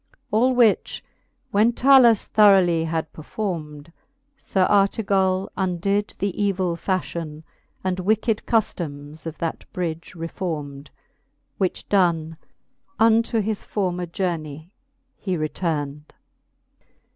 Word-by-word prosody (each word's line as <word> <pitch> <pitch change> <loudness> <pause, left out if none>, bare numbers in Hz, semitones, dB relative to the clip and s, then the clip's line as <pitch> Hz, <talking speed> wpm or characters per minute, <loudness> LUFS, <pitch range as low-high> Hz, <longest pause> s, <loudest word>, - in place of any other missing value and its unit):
All 250 +4 +3
which 235 -4 +2 0.5
when 215 +4 +3
Talus 250 -4 +5
throughly 190 -6 +4
had 160 -1 -3
perfourmed, 155 -3 -5 0.4
Sir 190 -8 0
Artegall 195 -2 +2
undid 195 +2 -1
the 200 -2 -1
evill 185 -3 0
fafhion, 170 -4 -3 0.4
And 185 0 -1
wicked 215 +3 +1
cuflomes 155 -8 -2
of 160 - -6
that 165 -1 -4
bridge 170 -1 -4
refourmed. 155 -4 -5 0.7
Which 185 -3 -2
done, 165 -5 +1 0.6
unto 225 0 +3
his 210 0 -3
former 180 -3 -2
journey 165 -2 -4 0.5
he 185 -3 -2
retourned. 150 -2 -3
185 Hz, 100 wpm, -23 LUFS, 160-205 Hz, 0.7 s, Talus